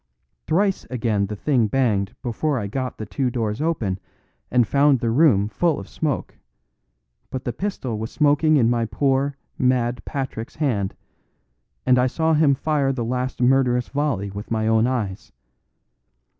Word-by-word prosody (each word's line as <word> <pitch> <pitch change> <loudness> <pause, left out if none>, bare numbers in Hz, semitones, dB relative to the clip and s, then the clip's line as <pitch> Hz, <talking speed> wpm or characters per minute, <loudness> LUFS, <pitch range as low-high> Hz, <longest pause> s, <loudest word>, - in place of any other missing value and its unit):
Thrice 195 +4 +1
again 110 -5 0
the 105 - -5
thing 120 0 +1
banged 105 -5 0
before 135 +4 -1
I 105 - -2
got 130 +5 -4
the 110 - -5
two 130 +4 -1
doors 115 -1 -2
open 115 - -1 0.5
and 125 -1 +3
found 140 0 +4
the 115 -2 0
room 115 -7 +4
full 160 +9 0
of - - -9
smoke; 150 -3 -3 0.9
but 130 - -5
the 120 - -2
pistol 130 - -3
was 110 +1 -4
smoking 150 +1 +3
in 120 -4 +4
my 120 -1 +1
poor, 135 +3 0 0.2
mad 125 -1 +1
Patrick's 130 -4 -5
hand; 115 -11 -1 0.9
and 125 -1 +4
I 125 - +3
saw 160 +5 +1
him 150 -3 +4
fire 145 -1 0
the 125 -3 -3
last 125 +1 -2
murderous 125 -1 +3
volley 140 -9 -1
with 100 +2 -7
my 110 -1 0
own 110 +1 +3
eyes. 110 -7 -3
125 Hz, 155 wpm, -22 LUFS, 110-140 Hz, 0.9 s, found